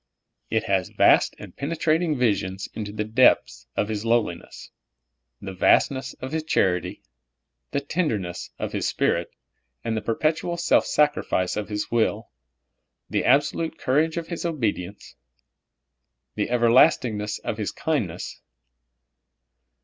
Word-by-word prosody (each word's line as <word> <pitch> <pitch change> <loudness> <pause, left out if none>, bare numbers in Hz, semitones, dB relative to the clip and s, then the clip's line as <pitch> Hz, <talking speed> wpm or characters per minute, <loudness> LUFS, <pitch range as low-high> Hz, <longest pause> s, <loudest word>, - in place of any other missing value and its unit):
It 110 - +1
has 95 -2 0
vast - - +4
and - - -11
penetrating 160 +1 0
vivsions 100 -5 0
into 105 -2 -5
the 105 0 -2
depths 110 - +3
of 105 - +1
His 105 -1 -3
lowliness, 115 -7 -2 0.7
the 95 -1 -7
vastness 130 +8 +2
of 130 +1 -7
His 160 0 -1
charity, 95 - 0 0.7
the 140 - -1
tenderness 115 - -2
of - - -4
His - - -1
Spirit, 85 0 0 0.5
the 110 -1 -1
perpet 155 +9 0
ual 170 +1 -4
self - - +3
sacrifice 145 -11 +1
of 105 0 -4
His 105 0 -3
will, 115 -1 0 0.8
the - - +1
absolute 145 +5 +2
courage 155 +5 +1
of 165 -1 -4
His 170 - -4
obedience, 105 - -3 1.2
the - - -1
everlastingness 115 -3 +3
of - - -5
His - - -2
kindness. - - -3
115 Hz, 125 wpm, -24 LUFS, 105-150 Hz, 1.2 s, vast